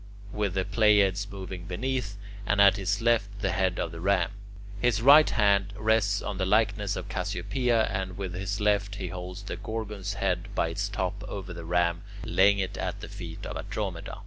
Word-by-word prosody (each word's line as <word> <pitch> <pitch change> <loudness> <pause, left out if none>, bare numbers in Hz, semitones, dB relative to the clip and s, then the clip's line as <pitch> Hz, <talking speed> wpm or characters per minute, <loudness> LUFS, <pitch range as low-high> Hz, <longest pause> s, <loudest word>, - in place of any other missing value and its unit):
with 105 -3 -1
the 95 -1 0
Pleiades 100 -1 +3
moving 95 -2 -7
beneath, 115 +2 -2 0.3
and 100 - +2
at 100 -1 +7
his 100 +2 -1
left 115 -3 +3
the 95 -2 +1
head 95 0 0
of 80 - -2
the 85 - -8
Ram. 95 0 +1 0.5
His 120 -2 +2
right 145 +6 +8
hand 100 -2 +2
rests 105 -2 +2
on 100 -2 -4
the 95 - +1
likeness 105 -1 +2
of - - -5
Cassiopea, 110 +6 0
and 95 -3 -3
with 95 -3 -4
his 95 +3 -3
left 100 -1 +1
he 90 - -4
holds 90 +1 -7
the - - -5
Gorgon's 105 -3 -4
head 95 -2 -1
by 80 - +1
its 95 +5 -2
top 100 0 -3
over 95 -2 -6
the 85 -1 -8
Ram, 85 0 +1 0.2
laying 100 +1 +4
it 95 -1 -3
at - - -3
the - - -8
feet - - -8
of - - -5
Andromeda. - - -4
100 Hz, 190 wpm, -28 LUFS, 95-105 Hz, 0.5 s, right